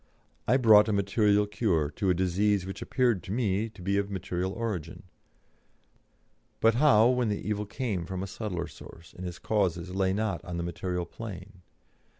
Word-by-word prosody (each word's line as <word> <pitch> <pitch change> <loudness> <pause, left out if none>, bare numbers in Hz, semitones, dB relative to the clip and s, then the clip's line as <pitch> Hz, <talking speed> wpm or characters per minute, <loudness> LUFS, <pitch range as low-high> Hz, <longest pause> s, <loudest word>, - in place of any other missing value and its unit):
I 125 - +5
brought 110 -4 +7
a 110 - 0
material 100 +1 +2
cure 95 -8 0
to 95 +6 -1
a 90 - +3
disease 95 +2 +1
which 95 - -7
appeared 120 -7 +1
to - - -8
me 110 -1 0
to 105 -4 -13
be 100 +2 +1
of 100 0 -2
material 95 -1 -3
origin; 100 -8 -4 1.6
but 115 0 +4
how 120 -4 +5
when 125 -3 +1
the 105 - -3
evil 105 -1 -2
came 100 -8 -3
from 95 0 -4
a - - -2
subtler 95 -4 -4
source, 85 0 -13
and 90 0 -6
its 90 0 -7
causes 90 -4 -1
lay 95 -1 +1
not 100 -4 -2
on 90 -2 -5
the 85 - -2
material 90 +1 -3
plane? 95 -3 -9
100 Hz, 175 wpm, -28 LUFS, 90-110 Hz, 1.6 s, brought